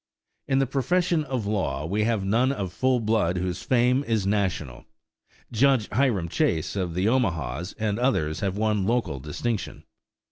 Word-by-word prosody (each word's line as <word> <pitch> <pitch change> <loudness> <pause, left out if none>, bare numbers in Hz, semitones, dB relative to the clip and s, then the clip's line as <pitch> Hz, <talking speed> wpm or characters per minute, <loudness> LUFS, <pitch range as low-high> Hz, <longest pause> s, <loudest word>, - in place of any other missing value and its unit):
In 135 - +2
the 135 - +3
profession 155 +5 +1
of 130 -6 -3
law 100 -7 -1
we 105 +5 0
have 110 -4 0
none 120 +7 +2
of 95 -9 -4
full 130 +3 +2
blood 105 -5 +1
whose 90 +1 -2
fame 125 +2 +2
is 110 -4 0
national. 95 - -1 0.7
Judge 125 -1 +3
Hiram 110 -7 +1
Chase 85 0 0
of 90 -4 -2
the 90 +2 0
Omahas 90 - 0
and 105 -1 -1
others 80 - 0
have 100 -1 -2
won 105 -3 +1
local 110 - 0
distinction. 100 - -4
105 Hz, 155 wpm, -25 LUFS, 90-125 Hz, 0.7 s, the